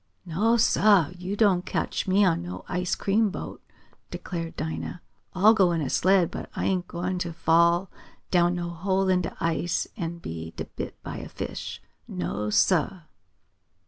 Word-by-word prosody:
"No, 210 +8 +2
sah! 205 -7 +4
Yo' 185 +3 -4
don't 200 -4 +3
cotch - - -2
me 195 +2 +4
on 170 -2 +2
no 175 +1 -7
ice 180 0 -1
cream 210 +2 +2
boat!" 195 - -7 0.5
declared 165 -2 -5
Dinah. 160 +2 -4 0.4
"I'll 205 +4 +6
go 190 -5 +4
in 165 - 0
a 130 - -3
sled, 185 -2 +3
but - - -6
I - - -2
ain't 180 -2 0
gwine 180 +1 -3
t' 170 -1 -3
fall 170 +2 +3 0.4
down 175 -1 +3
no 175 -1 -3
hole 190 +3 0
in 185 -1 +3
de 165 - -5
ice 165 +1 0
and 170 -4 -4
be 80 - -7 0.2
bit - - -5
by - - -6
a - - -7
fish! - - -6 0.2
No, 95 +4 -3
sah!" 150 - +2
175 Hz, 165 wpm, -26 LUFS, 165-190 Hz, 0.5 s, I'll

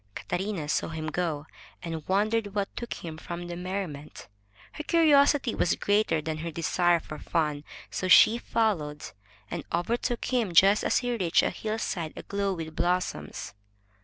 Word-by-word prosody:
Catarina 190 -5 -3
saw - - 0
him 160 -1 -4
go, 155 -3 -2 0.4
and 165 -3 -5
wondered 210 +1 +1
what 200 -1 -2
took 235 - -6
him 160 -2 -8
from 175 +1 -6
the 175 0 -5
merriment. 180 -5 -5 0.4
Her 300 - -7
curiosity 290 -6 +4
was 175 - +1
greater 205 -7 +1
than 155 -1 -3
her 170 +2 -4
desire 170 +2 +2
for 155 -1 -9
fun, 150 -3 -1 0.3
so 185 - -2
she 220 +5 +7
followed, 165 -13 -1 0.5
and 170 -3 -3
overtook 230 +7 -1
him 230 -9 0
just 195 +4 +6
as - - +2
he 245 -1 0
reached 180 -6 +2
a - - +1
hillside 215 -7 -3
aglow 200 -1 -2
with 160 -3 -5
blossoms. 175 - -2
180 Hz, 155 wpm, -28 LUFS, 160-215 Hz, 0.5 s, she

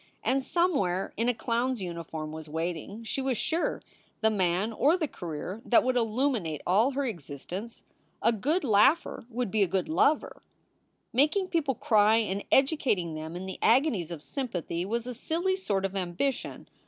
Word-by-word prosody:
And 270 +1 +1
somewhere 255 - +1
in 230 +3 +1
a - - +3
clown 235 +2 0
s 245 - -6
uniform 165 -4 -5
was 160 -1 -8
waiting, 170 +7 -4
she 250 +4 -3
was 260 -3 0
sure, 330 +8 -1 0.4
the 220 0 +4
man 190 +2 +1
or 300 +10 +3
the 320 -4 -1
career 180 - -6
that 235 - +4
would 255 0 +1
illuminate 225 - 0
all 220 +9 +3
her 280 +1 -1
existence. 185 - -6 0.4
A 230 - +5
good 290 - 0
laugher 265 +6 +3
would 240 -3 -2
be 215 - +1
a 195 - +4
good 190 +1 -1
lover. 310 -1 +1 0.7
Making 310 - +2
people 295 -6 0
cry 215 -1 +4
and 205 -3 0
educating 265 - +2
them 160 +2 -6
in 180 +2 -5
the 190 - -6
agonies 235 - +3
of 165 -4 -7
sympathy 180 - -3
was 235 +2 -2
a 250 - -4
silly 340 +9 -1
sort 200 - -1
of 195 0 -3
ambition. 190 +9 -2
220 Hz, 170 wpm, -28 LUFS, 180-270 Hz, 0.7 s, A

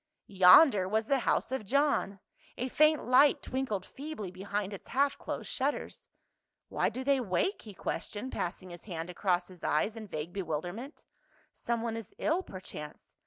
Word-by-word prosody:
Yonder 190 - +7
was 220 +2 +1
the 275 +3 +2
house 240 - 0
of 265 -4 -2
John, 260 -4 +1 0.4
a 255 +2 -2
faint 305 +2 +4
light 255 +4 +5
twinkled 235 -8 -2
feebly 280 - -7
behind 200 +2 -3
its 195 - -9
half 280 +1 +2
closed - - -5
shutters. 280 +2 -3 0.3
" - - -57
Why - - +1
do 260 - -5
they 275 0 +3
wake?" 250 - 0
he 210 -3 -11
questioned, 215 +7 -4
passing 180 +1 -4
his 175 0 -11
hand 170 -3 -5
across 180 -1 0
his 180 -2 -15
eyes 205 +9 +1
in 220 -2 -8
vague 160 -1 -5
bewilderment. 185 - -5 0.3
" - - -33
Someone 230 -1 -2
is 225 -3 -8
ill, 330 +4 +1
per 190 - -9
chance. 150 -4 -10
215 Hz, 170 wpm, -31 LUFS, 185-265 Hz, 0.4 s, Yonder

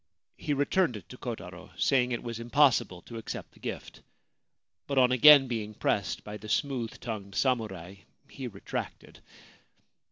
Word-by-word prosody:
He 145 - -2
returned 145 - +1
it 95 - -13
to - - -10
Kotaro, - - -7
saying 125 -2 +3
that 125 - 0
it - - -7
was 115 -1 -5
impossible 120 -7 +2
to 115 -1 -8
accept 110 - -7
the - - -21
gift; - - -7 0.9
but 140 - -2
on 125 -1 +5
again 135 +2 +8
being 110 -3 -4
pressed 100 -2 -1
by 105 0 -7
the 105 +1 -10
smooth 125 -3 -1
tongued 100 -4 -6
samurai 100 -8 -1 0.3
he 130 -2 -7
retracted. 100 -4 -7
120 Hz, 155 wpm, -29 LUFS, 105-135 Hz, 0.9 s, again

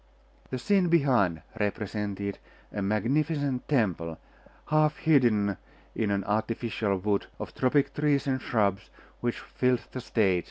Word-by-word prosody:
The 130 - -2
scene 185 +8 +2
behind 125 - +3 0.2
represented 100 -1 -2 0.3
a 105 - -2
magnificent 135 +6 0
temple, 90 - 0 0.5
half 155 0 +3
hidden 110 - +3 0.4
in 110 -2 0
an 100 -1 0
artificial 110 0 -1
wood 100 +1 0
of - - -7
tropic 140 +2 +2
trees 145 -2 +1
and 130 -2 0
shrubs, 100 -4 0 0.3
which 120 -1 -2
filled 125 -1 0
the 130 - -5
stage. 100 -7 +2
115 Hz, 125 wpm, -28 LUFS, 100-140 Hz, 0.5 s, behind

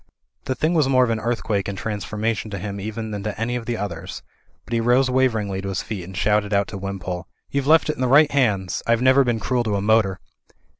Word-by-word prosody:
The 130 - -1
thing 155 +7 0
was 155 -5 +3
more 130 -1 +5
of 120 - +1
an 110 - 0
earthquake 110 -4 -1
and 100 -1 -4
transfor 105 +1 -4
mation 110 -1 -1
to 100 - -5
him 100 +1 -5
even 110 +2 -5
than 105 -1 -4
to 105 +1 -5
any 120 +2 -1
of 120 -2 -5
the 120 -1 -1
others; 90 -3 -6 0.4
but 120 - -7
he 115 - +2
rose 125 +3 +3
waveringly 110 -7 +1
to 100 - -4
his 95 - -2
feet 100 -4 -5
and 95 +1 -9
shouted 105 0 +1
out 100 -1 +2
to 100 - -6
Wimpole. 95 -2 -5 0.2
"YouVe 140 -1 -1
left 160 +1 +5
it 155 - -2
in - - -5
the 130 - +2
right 145 +3 +5
hands. 100 -10 +1
I've 115 +1 +2
never 130 +1 +6
been 120 -3 0
cruel 125 +2 0
to 105 -2 0
a - - 0
motor." 105 -3 +2
110 Hz, 250 wpm, -22 LUFS, 100-125 Hz, 0.4 s, never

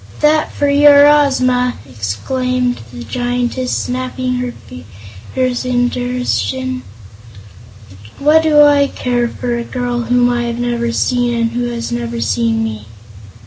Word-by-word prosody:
"That 305 +1 +2
for 285 - -1
your 285 0 +6
Ozma!" 255 -4 +2
exclaimed 245 - -2
the 120 -1 -8
Giantess, 245 - -2
snapping 255 0 -3
her 250 0 -3
fingers 115 - -6
in 245 -1 +1
derision. 255 +1 -2 1.4
"What 300 +3 +4
do 300 -2 +5
I 285 -1 +4
care 245 -3 -1
for 240 0 -3
a - - -3
girl 245 -1 -3
whom 245 +1 +2
I 240 -1 0
have 235 0 -3
never 240 -1 -1
seen 245 0 0
and 230 0 0
who 245 +1 -2
has 235 -1 -4
never 120 -1 -3
seen 110 0 0
me?" 110 -1 -5
245 Hz, 135 wpm, -16 LUFS, 235-255 Hz, 1.4 s, your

